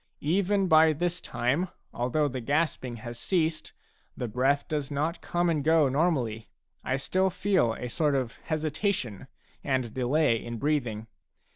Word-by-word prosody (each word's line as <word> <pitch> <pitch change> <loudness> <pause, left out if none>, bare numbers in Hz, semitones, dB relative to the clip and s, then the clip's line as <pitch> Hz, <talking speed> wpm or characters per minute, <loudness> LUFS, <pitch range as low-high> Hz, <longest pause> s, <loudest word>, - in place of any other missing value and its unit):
Even 195 +4 +2
by 160 -1 +6
this 175 +3 -2
time, 140 +10 -1 0.2
although 125 +5 +1
the 130 -2 -4
gasping 140 -2 0
has 120 0 -6
ceased, 160 -2 0 0.5
the 125 - -2
breath 135 +5 +1
does 150 -3 -2
not 150 +4 -2
come 175 0 0
and 155 -4 +1
go 160 -1 +4
normally; 130 -8 0 0.3
I 130 - 0
still 185 +7 +1
feel 185 - +1
a 125 - -5
sort 145 +4 +1
of 130 -4 -2
hesitation 155 - -2 0.4
and 130 -4 -1
delay 130 -2 +2
in 120 0 -5
breathing. 120 -6 -1
145 Hz, 145 wpm, -28 LUFS, 125-165 Hz, 0.5 s, by